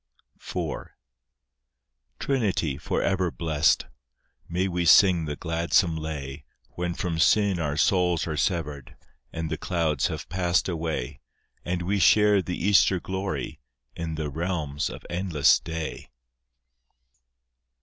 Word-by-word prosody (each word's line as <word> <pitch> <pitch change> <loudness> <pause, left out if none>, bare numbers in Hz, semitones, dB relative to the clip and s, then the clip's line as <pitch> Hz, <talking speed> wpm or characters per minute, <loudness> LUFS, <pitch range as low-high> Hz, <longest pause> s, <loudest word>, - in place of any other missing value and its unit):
IV - - -5 1.3
Trinity, 100 - 0
for - - -1
ever 95 -2 +1
blessed! 80 -1 +1 0.6
May 90 +3 0
we 90 -1 -1
sing 85 0 +6
the 75 -1 -4
gladsome 85 +1 +1
lay, 75 -4 -6 0.3
When 90 0 -3
from 85 -3 -3
sin 100 +1 +3
our 75 -2 -2
souls 90 0 +2
are 80 - -3
severed, 75 -4 -2 0.4
And 80 -1 -4
the 80 - -3
clouds 80 -6 0
have - - -6
passed 90 -1 +1
away, 80 -6 -3 0.4
And 90 0 -2
we 100 +3 0
share 105 +2 +5
the 90 -1 -4
Easter 95 -1 +4
glory, 95 -7 -4 0.4
In 85 -1 -4
the 75 -2 -4
realms 80 -3 -2
of - - -10
endless 85 -4 +3
day? 80 -1 -6
85 Hz, 120 wpm, -26 LUFS, 80-90 Hz, 1.3 s, sing